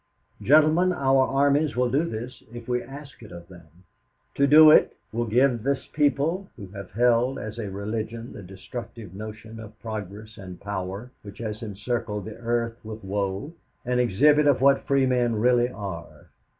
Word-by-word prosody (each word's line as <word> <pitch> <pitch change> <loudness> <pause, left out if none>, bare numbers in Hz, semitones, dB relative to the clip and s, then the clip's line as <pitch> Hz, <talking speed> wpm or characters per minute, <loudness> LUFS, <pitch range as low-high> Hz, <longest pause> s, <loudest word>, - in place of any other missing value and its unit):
"'Gentlemen, 155 +5 +4
our 135 -4 +2
armies 145 +2 +2
will 125 -1 +1
do 145 +6 +2
this 115 +2 -7
if 120 -1 -10
we 125 0 0
ask 140 +1 -11
it 110 - -12
of 85 -1 -11
them. 85 -3 -14 0.7
To 140 - +2
do 155 +2 +9
it - - +4 0.2
will 120 +1 -1
give 120 +1 +2
this 135 +2 -1
people 155 +6 0
who 100 -6 -10
have 100 -1 -9
held 120 +3 +2
as 110 +2 -7
a 105 -3 -4
religion 110 +4 -5
the - - -9
destructive 100 +2 -9
notion 110 +2 -9
of 110 0 -12
progress 110 -1 -7
and 90 -2 -10
power 100 +3 -5
which 100 -2 -11
has 110 -2 -5
encircled 105 -1 -4
the 110 - -8
earth 115 0 -2
with 110 0 -8
woe, 100 - -3 0.3
an 125 0 0
exhibit 145 +6 +4
of 140 -3 +4
what 135 +1 +3
free 135 -1 +3
men 125 -2 +1
really 120 +2 +3
are. 95 -8 -8
115 Hz, 170 wpm, -25 LUFS, 105-135 Hz, 0.7 s, do